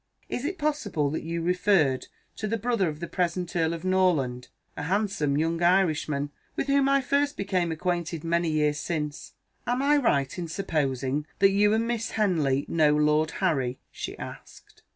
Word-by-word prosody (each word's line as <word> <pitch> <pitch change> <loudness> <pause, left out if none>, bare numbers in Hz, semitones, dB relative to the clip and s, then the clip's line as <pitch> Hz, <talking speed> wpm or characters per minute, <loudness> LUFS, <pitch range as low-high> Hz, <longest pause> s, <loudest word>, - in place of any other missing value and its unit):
Is 250 - -3
it 365 +5 -2
possible 265 - -1
that 155 - -2
you 165 +1 -3
referred 180 -6 +2 0.3
to 215 - -3
the 230 +2 -1
brother 225 -5 0
of 150 +1 -8
the 170 - -3
present 180 0 -2
Earl 165 -1 +2
of 165 +2 -8
Norland? 165 -10 +1 0.3
A - - -5
handsome 180 -4 0
young 165 +2 0
Irishman 155 -5 +2 0.2
with - - -1
whom 275 0 +3
I 275 0 +4
first 285 +3 0
became 185 -4 0
acquainted 170 -1 -2
many 170 0 +1
years 150 -1 +1
since. 150 -3 -4 0.3
Am 245 +2 0
I 295 +1 +4
right 140 - +1
in 170 - -3
supposing 145 -5 -1
that 195 0 +5
you 205 +1 +4
and 225 +1 +1
Miss 235 -1 -2
Henley 155 -10 +1
know 155 -2 +3
Lord 150 +1 +3 0.2
Harry?" 130 -7 0
she - - -6
asked. - - -11
170 Hz, 170 wpm, -27 LUFS, 150-205 Hz, 0.3 s, that